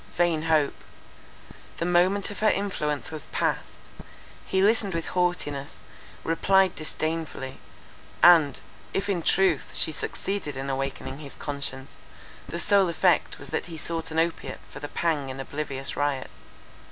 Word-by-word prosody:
—Vain 170 -3 +2
hope! 155 -3 +3 1.0
The 170 - -1
moment 185 +3 +3
of 205 - -7
her 215 - +4
influence 155 -10 -1
was 155 -2 -6
passed. - - -1 0.7
He 190 0 +2
listened 205 -3 +3
with 165 - -2
haughtiness, 175 -6 -1 0.4
replied 190 +3 +3
disdainfully; 155 -4 -3 0.6
and, 160 -6 +7 0.3
if 200 +1 0
in 185 -4 +1
truth, 180 -3 +2
she - - +2
succeeded 155 -1 -3
in 135 +1 -2
awakening 135 +1 -3
his 145 -3 -9
conscience, 140 -2 -5 0.5
the 170 - -3
sole 195 0 +4
effect 175 +1 +2
was - - -10
that - - -2
he 165 -2 -7
sought 165 +1 -3
an 160 - -4
opiate 165 +1 0
for - - -8
the 145 - -5
pang 150 -4 0
in 130 0 -6
oblivious 135 -1 -4
riot. 145 -2 -1
160 Hz, 140 wpm, -26 LUFS, 145-180 Hz, 1.0 s, and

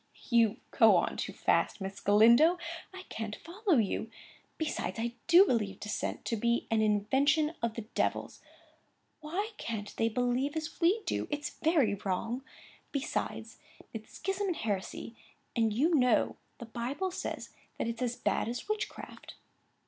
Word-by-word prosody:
"You 230 -2 +4
go - - +6
on - - +1
too - - -3
fast, - - +1
Miss 195 0 -5
Galindo! 235 - +6 0.3
I 375 0 -9
can't 220 -1 -4
follow 365 -1 0
you. 220 0 0 0.5
Besides, 310 -6 -2
I 230 +1 -1 0.2
do 355 +4 +8
believe 210 - 0
dissent 210 - -3
to 230 - 0
be 235 +2 +1
an 225 -1 +3
invention 265 +9 +2
of 230 -1 -1
the 230 - -4
Devil's. - - -1 0.8
Why 365 +9 -3
can't 210 -3 -5
they 225 - +2
believe 250 +5 0
as 315 +2 -5
we 385 +6 +3
do? - - -1
It's 295 0 -3
very 300 -10 +2
wrong. 225 +7 -2 0.5
Besides, 280 0 -3 0.3
its 220 -1 -8
schism 390 +1 -2
and 360 - 0
heresy, 210 +1 -3 0.4
and, 225 -2 +2
you 290 +11 +2
know, 250 -6 +3 0.2
the 235 - -8
Bible 255 +11 -3
says - - -5 0.3
that's 230 +1 -3
as 245 -1 0
bad - - 0
as 245 +8 -5
witchcraft." 430 0 -5
240 Hz, 150 wpm, -31 LUFS, 220-315 Hz, 0.8 s, do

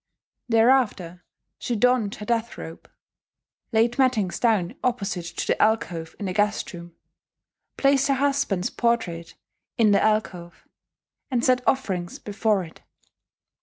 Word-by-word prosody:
Thereafter 225 -7 +2 0.4
she 240 - -2
donned 240 -2 +2
her 210 - -8
death 235 0 -1
robe; 165 - -10 0.8
laid 235 +3 +1
mattings 225 -9 +1
down 215 -7 +1
opposite 200 -8 -2
to 170 - -4
the - - 0
alcove 175 -7 0
in 205 - -5
the 185 - -2
guest 205 +1 0
room; 170 -1 -10 0.8
placed 275 0 +3
her 275 - +2
husband's 270 -9 0
portrait 185 -9 -1 0.4
in 220 -3 +4
the 200 - +4
alcove, 190 -5 -2 0.6
and 245 -3 0
set 255 -1 +3
offerings 185 -10 -1
before 210 -1 0
it. 160 - -13
215 Hz, 130 wpm, -24 LUFS, 180-245 Hz, 0.8 s, in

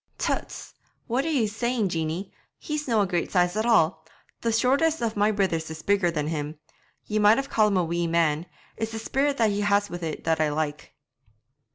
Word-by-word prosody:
'Tuts! - - -3 0.3
What 255 +4 -1
are - - -1
ye 270 -8 +2
saying, 225 0 -1
Jeanie! 165 +3 -3 0.2
He's 300 -2 -4
no' 225 -4 +3
a - - +2
great 175 -2 -2
size 180 0 +2
at 220 +2 0
all; 160 -8 +3 0.4
the 230 - 0
shortest 275 +8 +2
of 230 -2 -2
my 205 +1 +3
brithers 185 -6 -1
is 160 -1 -8
bigger 200 -3 +2
than 150 -3 -2
him! 150 -1 -4 0.5
Ye 215 0 -1
might 210 +1 +6
even 275 0 -3
ca' 215 -1 +4
him 200 -2 +1
a 180 - +2
wee 170 +1 -1
man; 165 0 +1 0.3
it's 225 0 -3
the - - -3
spirit 275 +5 0
that 225 -2 +3
he 205 0 -1
has 205 0 +2
wi' 175 - -4
it 165 -3 -5
that 160 -1 +1
I 155 - +2
like.' 150 0 -4
200 Hz, 210 wpm, -25 LUFS, 165-225 Hz, 0.5 s, might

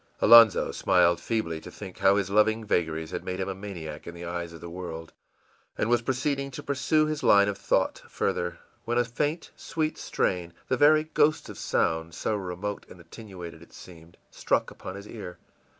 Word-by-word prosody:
Alonzo 115 -3 +7
smiled 85 -1 +3
feebly 85 -9 -2
to - - -10
think 95 -3 -10
how 100 0 +5
his 100 -1 -1
loving 110 +2 +3
vagaries 80 -4 -1
had - - -4
made 90 0 -4
him 95 - -2
a 95 - -2
maniac 95 -6 -8
in 85 - -7
the 85 0 -8
eyes 85 0 -4
of 85 - -11
the 85 - -8
world, 85 -2 -7 0.6
and 115 - 0
was 120 -1 +4
proceeding 140 +3 -1
to 130 - -8
pursue 150 +2 +1
his 155 -1 -3
line 100 0 +5
of 100 - -1
thought - - 0
further, 85 0 -2 0.3
when 120 +1 -1
a 120 - +3
faint, 145 +7 -2
sweet 155 -1 -3
strain, 90 -2 -1 0.2
the 130 - +3
very 155 +3 +5
ghost 155 0 +1
of - - -9
sound, 80 +1 0
so 110 - -1
remote 100 +1 -4
and 90 - -13
attenuated 90 0 -10
it - - -17
seemed, 85 -1 -14
struck - - 0
upon 95 - -8
his 100 +1 -9
ear. 95 -6 -8
100 Hz, 190 wpm, -27 LUFS, 85-120 Hz, 0.6 s, Alonzo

